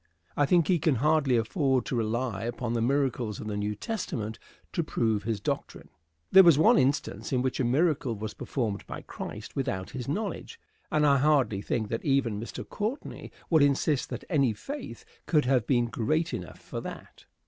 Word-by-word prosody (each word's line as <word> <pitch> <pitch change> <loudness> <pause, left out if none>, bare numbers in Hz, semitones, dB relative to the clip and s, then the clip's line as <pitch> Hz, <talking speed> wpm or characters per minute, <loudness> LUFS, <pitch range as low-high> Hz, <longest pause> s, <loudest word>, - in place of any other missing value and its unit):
I 145 - +2
think 170 -2 +4
he 180 -3 +3
can 155 -2 +2
hardly 145 -1 +3
afford 130 - +1
to - - -2
rely 115 -2 -1
upon 120 0 -3
the 115 - 0
miracles 125 -4 0
of - - -6
the 105 -1 -3
New 105 +1 -2
Testament 115 - -4 0.3
to 170 - 0
prove 110 -8 0
his 110 -3 -1
doctrine. - - -4 0.4
There 190 -2 +9
is 165 -5 +7
one 155 - +6
instance 135 +3 0
in 125 -2 +1
which 130 - -1
a - - +2
miracle 135 -1 +1
was 105 +1 -5
performed 110 -7 -3
by - - -7
Christ 105 +2 -8
without 125 -10 -2
his 125 -2 -5
knowledge; 215 - -4 0.3
and 150 -1 +3
I 140 -1 +5
hardly 135 -8 +2
think 110 0 -2
that 115 - -3
even 135 -7 +1
Mr. 115 - -7
Courtney 220 +7 -4 0.2
would 160 -2 +5
insist 140 0 +2
that - - -5
any 140 - +2
faith 290 - -7 0.2
could 150 -5 +3
have 125 -3 +2
been 120 -3 +3
great 155 +9 -1
enough 90 - -6
for - - -6
that. - - -10
130 Hz, 185 wpm, -28 LUFS, 115-150 Hz, 0.4 s, There